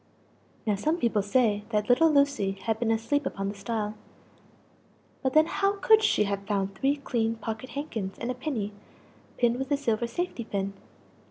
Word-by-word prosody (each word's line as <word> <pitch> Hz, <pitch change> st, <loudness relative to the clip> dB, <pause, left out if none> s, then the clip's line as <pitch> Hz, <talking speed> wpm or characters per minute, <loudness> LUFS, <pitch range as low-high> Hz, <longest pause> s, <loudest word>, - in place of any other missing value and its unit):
(Now 215 Hz, -, +2 dB
some 305 Hz, +12 st, 0 dB
people 230 Hz, -8 st, +1 dB
say 205 Hz, 0 st, +2 dB
that 210 Hz, -2 st, 0 dB
little 320 Hz, +7 st, +5 dB
Lucie 280 Hz, -9 st, +2 dB
had 220 Hz, -1 st, 0 dB
been 235 Hz, -, 0 dB
asleep 230 Hz, +6 st, +1 dB
upon 195 Hz, 0 st, -3 dB
the -, -, -4 dB
stile 210 Hz, +1 st, -3 dB, 1.3 s
but 260 Hz, -1 st, 0 dB
then 310 Hz, 0 st, +6 dB
how 395 Hz, +4 st, +1 dB
could 440 Hz, +2 st, +5 dB
she 320 Hz, -, +3 dB
have 200 Hz, -1 st, -3 dB
found 195 Hz, -2 st, 0 dB
three 270 Hz, +8 st, +1 dB
clean 230 Hz, -5 st, -1 dB
pocket 225 Hz, +2 st, -5 dB
handkins 220 Hz, -10 st, -4 dB
and 235 Hz, -, -3 dB
a -, -, -2 dB
pinny, 245 Hz, -6 st, -3 dB, 0.6 s
pinned 240 Hz, 0 st, +2 dB
with 265 Hz, 0 st, -3 dB
a 285 Hz, -, +3 dB
silver 235 Hz, -4 st, 0 dB
safety 300 Hz, 0 st, -3 dB
pin? 200 Hz, -2 st, -3 dB
230 Hz, 175 wpm, -28 LUFS, 210-280 Hz, 1.3 s, then